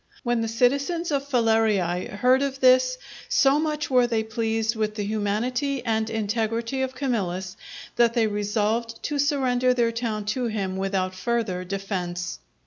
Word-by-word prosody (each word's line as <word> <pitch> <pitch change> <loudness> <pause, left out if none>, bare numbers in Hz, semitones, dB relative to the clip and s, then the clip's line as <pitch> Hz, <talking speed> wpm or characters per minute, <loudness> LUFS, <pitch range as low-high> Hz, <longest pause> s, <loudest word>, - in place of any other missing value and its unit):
When 240 -1 +1
the 225 - -1
citizens 280 +9 +1
of 280 -1 -1
Falerii 220 -8 +2
heard 250 +6 +3
of 275 -1 -2
this, 255 0 +4 0.3
so 285 - +4
much 300 -2 -2
were 250 -1 +4
they 225 -2 0
pleased 225 0 -1
with 215 -1 -1
the 205 -2 -3
humanity 235 +6 -1
and 220 -1 0
integrity 225 +3 -1
of 260 0 -2
Camillus, 190 -9 -2 0.4
that 235 0 +4
they 230 -2 +3
resolved 215 +2 -1
to 290 -1 -2
surrender 255 -3 +2
their 235 -2 +2
town 225 -3 -3
to 255 -2 -2
him 195 -4 -2
without 190 -1 -1
further 185 -2 -2
defence. 180 -2 -4
230 Hz, 150 wpm, -25 LUFS, 210-255 Hz, 0.4 s, this